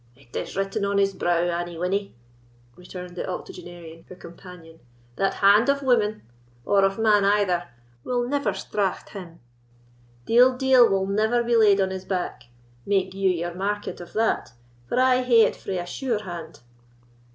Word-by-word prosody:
"It 130 -2 -20
is - - -5
written 195 +2 -2
on 200 0 0
his 195 0 +2
brow, 175 -2 0
Annie 175 -1 -3
Winnie," 195 +2 -2 0.6
returned 180 0 -10
the 180 - -5
octogenarian, 175 -2 -9
her 185 - -10
companion, 170 -2 -13 0.4
"that 195 - 0
hand 205 +6 +4
of 280 0 +1
woman, 220 -5 +1 0.4
or 200 -1 +3
of 195 0 +1
man 215 -2 +3
either, 195 -3 +1 0.3
will 245 -1 -1
never 285 +2 0
straught 200 -3 -3
him: 175 -4 -10 0.9
dead 250 +2 +5
deal 260 -3 +5
will 195 0 +1
never 220 +4 +1
be 235 0 +1
laid 210 -3 +5
on 190 -1 +1
his 190 0 -6
back, 180 -10 -4 0.4
make 190 -2 0
you 195 0 +1
your 175 -1 -2
market 205 +1 -4
of 175 - -12
that, 220 - -1 0.4
for 250 - 0
I 255 0 +4
hae 240 -2 +4
it - - +1
frae 190 - -5
a 175 - -4
sure 230 +2 -3
hand." 170 - -8
195 Hz, 165 wpm, -24 LUFS, 175-220 Hz, 0.9 s, dead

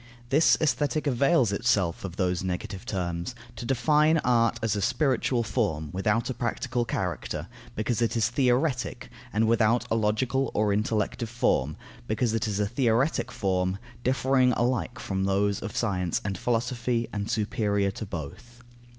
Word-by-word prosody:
This 150 +4 +5
Aesthetic 150 0 0
avails 135 - +3
itself 100 -6 +1
of 95 -3 -6
those 90 -1 0
negative 95 +3 -4
terms, 90 +3 -3 0.2
to 120 - -6
define 150 +5 +3
art 115 -1 +3
as 110 -2 +1
a 100 - -1
spiritual 130 - +1
form 80 - -1
without 105 +4 +1
a 130 - -2
practical 120 +1 -2
character, 90 -7 -3 0.3
because 115 +2 -1
it 115 0 +1
is 115 - +3
theoretic, 125 0 0 0.2
and 110 +2 +2
without 115 +1 +3
a - - +3
logical 115 +5 +1
or 105 -1 +2
intellective 110 +2 -1
form, 75 - 0 0.3
because 110 +1 0
it 115 -1 0
is 105 -1 -2
a 105 - +2
theoretic 120 +5 +1
form, 95 -1 0 0.3
differing 130 0 +3
alike 120 -6 0
from 95 0 -2
those 100 +1 +1
of 110 - -5
science 90 -7 0
and 100 -1 -1
of - - -9
philosophy, 120 0 0
and 105 0 -3
superior 105 -2 0
to 110 - -6
both. 95 - -8
115 Hz, 155 wpm, -27 LUFS, 100-125 Hz, 0.3 s, This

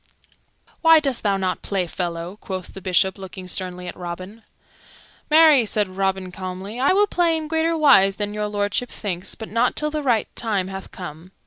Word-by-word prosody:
"Why 325 -1 +7
dost 275 -5 -1
thou 200 -2 +1
not 185 -1 -2
play, 195 -3 -1
fellow?" 170 +2 -4
quoth 185 -2 -6
the 195 - -9
Bishop, 190 +1 +1
looking 190 -1 -8
sternly 180 0 -4
at - - -6
Robin. 185 +5 -7 0.9
"Marry," 310 -4 +7
said 210 -1 +1
Robin 190 0 -2
calmly, 190 +5 -6
"I 270 - +3
will 405 +2 +5
play 345 -4 +1
in 310 -1 -5
greater 325 +1 +1
wise 195 -11 +6
than 205 0 -3
Your 210 0 -2
Lordship 205 +4 -1
thinks, 185 -4 -4
but 220 - -8
not 230 +3 +1
till 300 0 -1
the 305 0 -2
right 240 -6 +1
time 200 -5 -1
hath 190 0 -7
come." 175 +1 -9
200 Hz, 185 wpm, -22 LUFS, 185-255 Hz, 0.9 s, Why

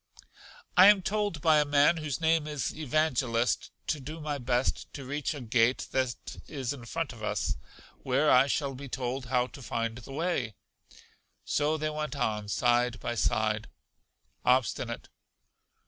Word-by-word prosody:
I 185 +2 +9
am 205 -2 +6
told 205 -6 -1
by 155 -1 +5
a - - +4
man 145 +3 +4
whose 155 -3 -3
name 160 -2 +2
is 150 -3 -3
Evangelist, 130 -5 +1 0.2
to 155 - -1
do 155 +4 -7
my 150 -2 -3
best 125 0 -1
to 135 - -7
reach 145 +3 -2
a 145 - -7
gate 120 +1 +2
that 130 -2 0 0.3
is 135 -3 -3
in 125 -4 -10
front 160 +2 -3
of 115 - -13
us, 105 - -1 0.5
where 135 +4 +2
I 130 +2 +6
shall 140 -1 -1
be 135 +1 -8
told 125 0 -3
how 125 -1 +2
to 135 - -12
find 115 0 -3
the 120 +3 -11
way. 145 - -1 0.9
So 150 +2 +1
they 155 0 -1
went 150 -1 -3
on 110 -5 -1
side 120 +2 +2
by 120 - -3
side. 110 -1 0 0.7
Obstinate. 125 -1 +1
135 Hz, 160 wpm, -29 LUFS, 120-155 Hz, 0.9 s, I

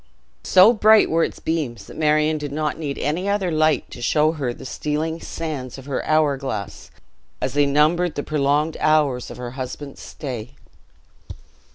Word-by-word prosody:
So 190 +5 +7
bright 215 -1 +5
were 165 +1 +3
its - - -3
beams, 145 -10 -3
that - - -12
Marion 155 0 +2
did 145 -1 -5
not 150 +1 -1
need 145 -3 -4
any 170 +7 -1
other 200 -3 0
light 155 0 +1
to 120 - -9
show 150 +5 +3
her 140 -6 -3
the 120 - -10
stealing 155 +4 -3
sands 145 -7 -5
of 135 - -11
her 140 -2 -3
hour 155 -3 +3
glass, 110 -8 -6 0.5
as 130 - -2
they 145 0 +3
numbered 155 +4 +2
the 145 - -3
prolonged 150 +1 0
hours 145 -5 +2
of - - -9
her 125 -1 -6
husband's 130 +2 -7
stay. 125 -6 -7
150 Hz, 170 wpm, -22 LUFS, 135-160 Hz, 0.5 s, So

